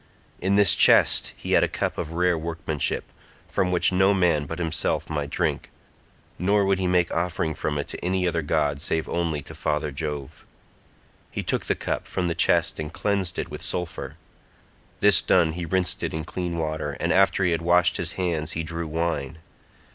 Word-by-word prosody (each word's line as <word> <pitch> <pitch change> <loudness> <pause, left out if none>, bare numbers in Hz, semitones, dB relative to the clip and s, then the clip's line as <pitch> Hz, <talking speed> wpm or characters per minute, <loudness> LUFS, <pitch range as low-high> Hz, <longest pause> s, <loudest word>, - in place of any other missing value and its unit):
In 95 +2 +1
this 100 -5 +6
chest - - +5
he - - -6
had - - +5
a - - +3
cup - - -3
of 80 - -4
rare 90 +1 +2
workmanship, 80 -2 -2 0.4
from 90 - 0
which 90 +1 +2
no 95 +2 +3
man 85 -6 +2
but 80 +3 -6
himself 85 -2 -1
might 75 -2 -2
drink, - - -1 0.7
nor 100 +3 +2
would 95 -1 +1
he 95 - 0
make 90 -1 +2
offering 85 -2 -1
from 75 0 -3
it 70 - -3
to - - -7
any 90 +1 0
other 85 -1 0
god 75 -1 0
save 80 +1 -1
only 80 -4 -2
to - - -11
father 75 0 -2
Jove. 75 -1 -5 0.9
He - - -4
took - - -1
the - - +1
cup - - -3
from 90 - -2
the 85 - 0
chest - - +2
and 75 0 -4
cleansed 100 -1 -1
it - - -4
with - - -7
sulphur; 90 -2 -3 0.9
this 100 -4 +6
done 85 -4 +3
he 85 +1 -5
rinsed 95 +1 0
it 80 -1 -3
clean 85 0 -4
water, 80 -2 -2
and 85 - +1
after 95 -1 +3
he 90 - +2
had 85 0 0
washed 85 0 +3
his 85 -1 -2
hands 85 -5 -2
he 80 - -2
drew 85 +1 -4
wine. 80 -2 -2
85 Hz, 190 wpm, -25 LUFS, 80-90 Hz, 0.9 s, this